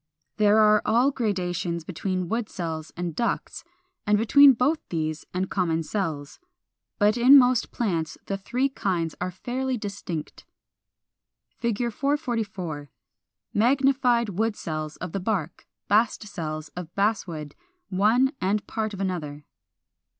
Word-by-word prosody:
There 210 Hz, 0 st, +4 dB
are 215 Hz, -1 st, +5 dB
all 245 Hz, +5 st, +3 dB
gradations 180 Hz, -, -2 dB
between 185 Hz, +1 st, -3 dB
wood 225 Hz, +2 st, -2 dB
cells 160 Hz, -3 st, -5 dB
and 175 Hz, -3 st, -3 dB
ducts, 235 Hz, -, -2 dB, 0.4 s
and 210 Hz, 0 st, +4 dB
between 275 Hz, +6 st, +7 dB
both 275 Hz, +7 st, +1 dB
these 155 Hz, -2 st, -3 dB
and 185 Hz, +1 st, -1 dB
common 165 Hz, -4 st, 0 dB
cells. 155 Hz, -6 st, -4 dB, 0.6 s
But 210 Hz, +2 st, +3 dB
in 255 Hz, +4 st, +8 dB
most 250 Hz, -2 st, +4 dB
plants 170 Hz, -9 st, -2 dB
the 195 Hz, -, -2 dB
three 245 Hz, +7 st, 0 dB
kinds 180 Hz, -, -2 dB
are 180 Hz, -, -1 dB
fairly 250 Hz, +7 st, -3 dB
distinct. 200 Hz, -7 st, -6 dB, 1.2 s
[Illustration: 235 Hz, -2 st, +1 dB, 0.2 s
Fig. -, -, -20 dB
444. 205 Hz, -, -2 dB, 0.6 s
Magnified 250 Hz, -1 st, +3 dB
wood 215 Hz, +3 st, -1 dB
cells 155 Hz, -3 st, -5 dB
of 180 Hz, -, -6 dB
the 195 Hz, -, -2 dB
bark 180 Hz, -5 st, -3 dB, 0.2 s
(bast 215 Hz, +1 st, +2 dB
cells) 155 Hz, -5 st, -5 dB
of 175 Hz, 0 st, -9 dB
Basswood, 175 Hz, -8 st, -1 dB, 0.4 s
one 220 Hz, +8 st, +3 dB
and 200 Hz, +3 st, 0 dB
part 215 Hz, -2 st, -3 dB
of 195 Hz, -, -6 dB
another. 150 Hz, -6 st, -4 dB
200 Hz, 130 wpm, -25 LUFS, 170-235 Hz, 1.2 s, in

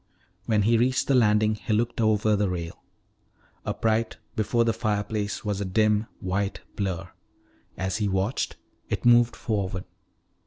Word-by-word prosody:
When 105 Hz, -3 st, +3 dB
he 115 Hz, +2 st, +3 dB
reached 130 Hz, +2 st, +2 dB
the 140 Hz, -, +3 dB
landing 110 Hz, -3 st, +4 dB
he 110 Hz, +1 st, -3 dB
looked 115 Hz, +2 st, 0 dB
over 110 Hz, -1 st, +3 dB
the 100 Hz, -1 st, +1 dB
rail. 85 Hz, -2 st, -5 dB, 0.9 s
Upright 115 Hz, 0 st, 0 dB, 0.2 s
before 115 Hz, +2 st, +1 dB
the 115 Hz, -, +2 dB
fireplace 105 Hz, -2 st, -2 dB
was 100 Hz, -1 st, -1 dB
a -, -, 0 dB
dim 105 Hz, +3 st, +2 dB
white 100 Hz, 0 st, -2 dB
blur. 95 Hz, -2 st, -3 dB, 0.7 s
As 95 Hz, +2 st, -1 dB
he 105 Hz, -2 st, 0 dB
watched, 95 Hz, +5 st, -1 dB, 0.3 s
it -, -, -2 dB
moved 120 Hz, 0 st, +5 dB
forward. 95 Hz, -4 st, -2 dB
105 Hz, 145 wpm, -26 LUFS, 100-115 Hz, 0.9 s, moved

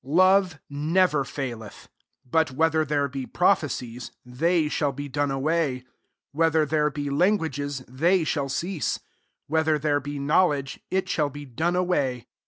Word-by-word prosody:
8 130 Hz, -, -14 dB
Love 185 Hz, 0 st, +4 dB
never 150 Hz, +1 st, +1 dB
faileth: 120 Hz, -7 st, -7 dB, 0.4 s
but 160 Hz, +4 st, +2 dB
whether 160 Hz, +4 st, +2 dB
there 145 Hz, -1 st, 0 dB
be 135 Hz, -1 st, -6 dB
prophecies, 125 Hz, -10 st, 0 dB, 0.2 s
they 155 Hz, +6 st, +1 dB
shall 150 Hz, -1 st, 0 dB
be 145 Hz, +2 st, -6 dB
done 145 Hz, +1 st, -1 dB
away; 135 Hz, -1 st, 0 dB, 0.5 s
whe 165 Hz, +3 st, +2 dB
ther 155 Hz, 0 st, +3 dB
there 150 Hz, 0 st, +1 dB
be 145 Hz, -1 st, -4 dB
languages, 145 Hz, -5 st, 0 dB
they 165 Hz, +8 st, +2 dB
shall 145 Hz, -3 st, -1 dB
cease; 165 Hz, -, -2 dB, 0.5 s
whether 160 Hz, 0 st, +1 dB
there 145 Hz, 0 st, +1 dB
ht 145 Hz, +1 st, -5 dB
knowledge, 145 Hz, -2 st, +1 dB
it 190 Hz, 0 st, 0 dB
shall 150 Hz, -5 st, 0 dB
be 145 Hz, +1 st, -9 dB
done 160 Hz, +8 st, -1 dB
away. 140 Hz, -10 st, 0 dB
145 Hz, 150 wpm, -25 LUFS, 135-165 Hz, 0.5 s, Love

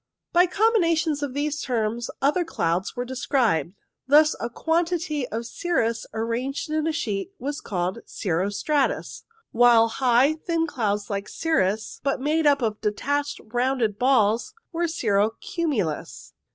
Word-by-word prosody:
By 355 Hz, +1 st, +5 dB
combinations 335 Hz, -7 st, +2 dB
of 280 Hz, -2 st, -3 dB
these 295 Hz, +1 st, -1 dB
terms 235 Hz, -1 st, -1 dB
other 300 Hz, +6 st, +3 dB
clouds 180 Hz, -, -1 dB
were 245 Hz, 0 st, -3 dB
described. 240 Hz, -, 0 dB, 0.3 s
Thus, 300 Hz, +2 st, +5 dB
a 235 Hz, -, -3 dB
quantity 325 Hz, -1 st, -1 dB
of 230 Hz, +2 st, -4 dB
cirrus 230 Hz, -5 st, -1 dB
arranged 245 Hz, -, -3 dB
in 310 Hz, 0 st, 0 dB
a -, -, +1 dB
sheet 230 Hz, -, -3 dB
was 285 Hz, +2 st, -4 dB
called 185 Hz, +1 st, -2 dB
cirro 185 Hz, 0 st, -1 dB
stratus, 280 Hz, +7 st, -1 dB, 0.3 s
while 230 Hz, -1 st, +5 dB
high, 255 Hz, +4 st, +3 dB
thin 330 Hz, +1 st, -1 dB
clouds 210 Hz, -8 st, -2 dB
like 200 Hz, 0 st, -3 dB
cirrus, 220 Hz, -, -1 dB
but 275 Hz, -1 st, 0 dB
made 305 Hz, +3 st, +1 dB
up 280 Hz, -3 st, +3 dB
of 215 Hz, -2 st, -1 dB
detached 285 Hz, +7 st, -1 dB
rounded 240 Hz, -2 st, 0 dB
balls, 235 Hz, -4 st, +2 dB, 0.2 s
was 335 Hz, 0 st, -1 dB
cirro 210 Hz, -, +2 dB
cumulus. 245 Hz, -, -3 dB
260 Hz, 140 wpm, -24 LUFS, 220-310 Hz, 0.3 s, By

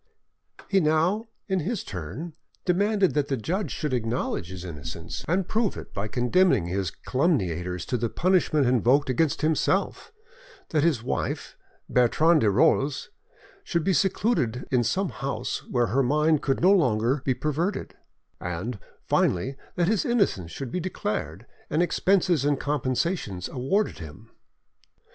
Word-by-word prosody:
He 195 Hz, -, +3 dB
now, 170 Hz, +7 st, +1 dB, 0.2 s
in 190 Hz, -2 st, +1 dB
his 200 Hz, +5 st, -2 dB
turn, 100 Hz, -, -6 dB, 0.3 s
demanded 200 Hz, +1 st, +2 dB
that 145 Hz, -1 st, +1 dB
the 135 Hz, -, -1 dB
judge 180 Hz, -, -2 dB
should 150 Hz, -4 st, -3 dB
acknowledge 115 Hz, -7 st, -2 dB
his 90 Hz, -1 st, -7 dB
innocence, 75 Hz, -6 st, -6 dB
and 180 Hz, +2 st, +1 dB
prove 220 Hz, -2 st, 0 dB
it -, -, -9 dB
by 100 Hz, +2 st, -3 dB
condemning 125 Hz, -, +2 dB
his 95 Hz, +1 st, -1 dB
calumniators 90 Hz, -, -1 dB
to 125 Hz, -, -1 dB
the 115 Hz, 0 st, -1 dB
punishment 170 Hz, -, +2 dB
invoked 130 Hz, +3 st, +3 dB
against 150 Hz, +4 st, 0 dB
himself; 155 Hz, 0 st, 0 dB, 0.6 s
that 155 Hz, -, +2 dB
his 150 Hz, -9 st, +2 dB
wife, -, -, -3 dB, 0.3 s
Bertrande 155 Hz, +7 st, +4 dB
de 110 Hz, -, +4 dB
Rolls, 135 Hz, +7 st, +2 dB, 0.5 s
should 170 Hz, -, -1 dB
be 190 Hz, -, +2 dB
secluded 180 Hz, -, +1 dB
in 125 Hz, -2 st, +3 dB
some 185 Hz, -, 0 dB
house 135 Hz, +1 st, -4 dB
where 120 Hz, -1 st, +2 dB
her 135 Hz, -, +4 dB
mind 150 Hz, +3 st, +2 dB
could 135 Hz, -, 0 dB
no 185 Hz, +3 st, +6 dB
longer 125 Hz, -, +2 dB
be 130 Hz, -, +1 dB
perverted, 160 Hz, +8 st, -2 dB, 0.4 s
and, 95 Hz, +6 st, -4 dB, 0.3 s
finally, 130 Hz, +10 st, +1 dB, 0.2 s
that 175 Hz, -2 st, +1 dB
his 210 Hz, -1 st, +2 dB
innocence 200 Hz, -, +1 dB
should 120 Hz, +8 st, -6 dB
be 180 Hz, -, -1 dB
declared, 105 Hz, -, -4 dB, 0.2 s
and 155 Hz, +3 st, +2 dB
expenses 180 Hz, -4 st, +2 dB
and 145 Hz, -1 st, +1 dB
compensations 130 Hz, -, -1 dB
awarded 165 Hz, -, -1 dB
him. 90 Hz, +8 st, -11 dB
140 Hz, 145 wpm, -26 LUFS, 115-175 Hz, 0.6 s, no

